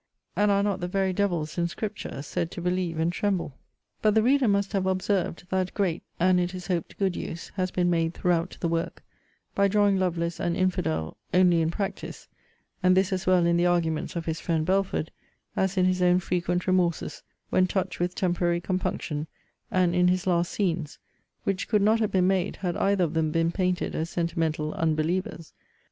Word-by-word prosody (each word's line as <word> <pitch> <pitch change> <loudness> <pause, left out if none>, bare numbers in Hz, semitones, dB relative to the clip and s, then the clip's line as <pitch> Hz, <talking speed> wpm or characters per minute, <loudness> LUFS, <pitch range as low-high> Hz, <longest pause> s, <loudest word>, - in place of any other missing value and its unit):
And 210 0 +3
are 200 0 +3
not 200 -2 0
the 175 - -3
very 190 0 0
devils, 175 -5 -1
in 170 - +2
Scripture, 200 -6 -5
said 165 +3 -2
to 175 - -7
believe 180 -2 -1
and 165 +2 +1
tremble? 180 -9 -2 0.4
But 215 -1 +3
the 220 - +4
reader 265 +1 +3
must 200 0 +1
have 190 -2 0
observed, 185 -2 -1
that, 185 -1 -1
great, 185 -5 0 0.2
and, 180 +1 +4
it 180 +1 -1
is 180 -1 -7
hoped, 175 -4 -3
good 190 -3 0
use, 170 - -6
has 185 -1 -2
been 180 -1 0
made 165 0 0
throughout 175 0 0
the 170 - +1
work, 165 0 -2 0.5
by 200 0 +3
drawing 200 -1 +3
Lovelace 170 -2 -1
an 170 -1 0
infidel, 80 - -1 0.2
only 180 -2 +5
in 160 - +1
practice; 195 +3 -5 0.5
and 185 0 +4
this 190 +1 +2
as 185 -1 -3
well 180 -2 +4
in 170 0 +3
the 175 +1 +3
arguments 165 -3 0
of 170 -1 -3
his 160 0 -2
friend 160 -2 0
Belford, 190 -3 0 0.4
as 190 0 0
in 185 - +4
his 185 0 +1
own 180 0 +5
frequent 180 0 -1
remorses, 180 -3 0 0.3
when 185 0 +4
touched 185 -1 -2
with 180 +1 -1
temporary 175 -1 +1
compunction, 170 -4 -2 0.4
and 180 -2 +2
in 180 0 +4
his 180 0 +1
last 175 -2 +1
scenes; 170 -7 -1 0.5
which 195 -1 -1
could 210 - +3
not 220 +2 +4
have 215 -2 0
been 185 -1 +3
made, 190 0 +1
had 175 -3 -3
either 195 -1 +2
of 165 - -1
them 160 -1 +1
been 165 +1 +1
painted 180 0 -1
as 160 +1 -2
sentimental 165 -3 -1
unbelievers. 165 +3 -1
180 Hz, 190 wpm, -26 LUFS, 170-190 Hz, 0.5 s, only